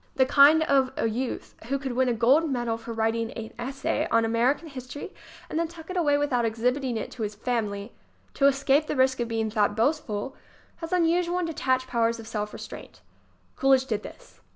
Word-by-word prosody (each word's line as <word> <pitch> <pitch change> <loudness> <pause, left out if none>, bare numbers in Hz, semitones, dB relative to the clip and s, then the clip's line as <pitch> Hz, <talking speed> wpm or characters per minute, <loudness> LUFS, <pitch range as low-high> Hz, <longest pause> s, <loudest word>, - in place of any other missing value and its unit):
The 260 - +4
kind 290 +4 +6
of 270 -3 +2
a - - +1
youth 240 +3 -4
who 275 +4 -1
could 270 -1 -4
win 255 +1 +1
a - - +2
gold 265 +8 +3
medal 240 -4 -1
for 230 +1 -8
writing 225 0 -1
an 225 -1 -7
essay 270 +3 -2
on 230 0 +3
American 240 +8 +1
history 275 +4 -8 0.3
and 315 - -2
then 335 - 0
tuck 325 +1 -11
it - - -5
away 295 -5 +3
without 280 -4 +1
exhibiting 245 +3 0
it - - -5
to 245 - -9
his 210 -1 -3
family, 210 -2 -3 0.4
to 275 - +4
escape 275 +2 +2
the - - -2
risk 260 0 +2
of 240 - -1
being 225 -1 -2
thought 210 -1 +1
boastful, 255 -2 -1 0.4
has 330 -1 -7
un 360 -2 +3
usual 345 +1 +1
and 360 - 0
detached 260 -5 0
powers 230 -2 0
of 225 - -9
self 210 -2 -3
restraint. - - -10 0.5
Cool 270 0 +3
idge 260 0 -2
did 215 -4 -1
this. - - -13
255 Hz, 205 wpm, -26 LUFS, 230-285 Hz, 0.5 s, kind